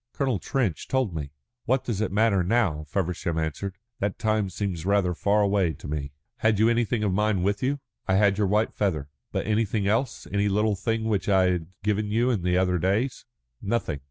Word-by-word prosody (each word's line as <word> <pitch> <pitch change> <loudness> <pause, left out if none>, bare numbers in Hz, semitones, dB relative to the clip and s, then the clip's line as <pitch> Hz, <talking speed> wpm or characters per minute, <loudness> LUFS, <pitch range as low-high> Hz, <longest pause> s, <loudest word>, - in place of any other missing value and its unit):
"Colonel 130 -7 0
Trench 120 - -1
told 130 -8 0
me." 75 -3 -4 0.4
"What 130 +1 +1
does 110 -4 -2
it 110 - -1
matter 100 -2 +3
now?" 90 -7 +1
Feversham 85 -2 -1
answered. 80 +5 -3 0.2
"That 100 0 -1
time 110 -2 +1
seems 95 -4 -3
rather 100 -2 +2
far 105 +4 +2
away 100 -5 +2
to - - -10
me." 70 -1 -3 0.3
"Had 110 -2 +2
you 110 +3 +4
anything 120 -1 +1
of 100 -3 +1
mine 105 -2 +1
with 100 +1 0
you?" 140 +2 0 0.3
"I 95 - +3
had 100 0 +3
your 105 - +3
white 105 +3 +1
feather." 80 -9 -1 0.2
"But - - -2
anything 105 -1 0
else? 115 +5 0
Any 100 0 +2
little 105 +1 +2
thing 115 +3 -1
which 105 -2 0
I 95 -2 +4
had 85 -3 -2 0.2
given 105 0 0
you 115 +4 +2
in 110 -7 0
the 90 +1 +1
other 90 -1 +2
days?" 105 +9 0 0.4
"Nothing." 100 -9 -1
100 Hz, 200 wpm, -26 LUFS, 90-110 Hz, 0.4 s, you